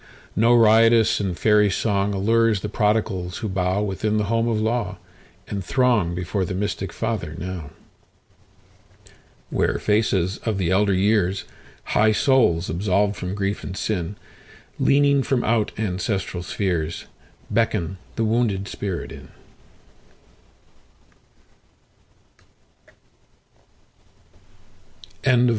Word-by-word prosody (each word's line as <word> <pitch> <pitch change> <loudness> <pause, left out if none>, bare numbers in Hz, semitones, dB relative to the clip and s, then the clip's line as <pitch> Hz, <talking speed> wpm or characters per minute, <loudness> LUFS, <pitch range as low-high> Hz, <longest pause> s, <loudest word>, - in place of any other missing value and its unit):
No 115 +4 +4
riotous 115 0 +5
and 95 -4 -2
fairy 105 -1 +4
songAllures 105 +2 +1
the 105 - -4
prodigals 105 -4 0
who 110 - -4
bowWithin 95 +3 -1
the 105 - +1
home 115 0 +1
of 115 -2 0
law, 110 -2 -1 0.5
and 100 - -4
throngBefore 95 -5 0
the 90 - -4
mystic 95 -2 -3
Father 105 -7 -3
now, 85 -4 -6 1.8
Where - - +1
faces 100 -3 +1
of 110 -3 -2
the 90 -2 0
elder 100 +1 +3
years, 100 -1 +1 0.4
High 110 +1 +2
souls 110 -9 +3
absolved 100 +4 0
from 90 +2 -5
grief 100 0 -2
and 95 - -6
sin, 95 -2 -2 0.6
Leaning 140 0 +4
from 130 -2 0
out 115 -1 +1
ancestral 95 -3 -2
spheresBeckon 85 0 -3 0.2
the 115 - 0
wounded 110 -4 0
spirit 95 -4 -5
in. - - -11
100 Hz, 95 wpm, -23 LUFS, 95-110 Hz, 1.8 s, riotous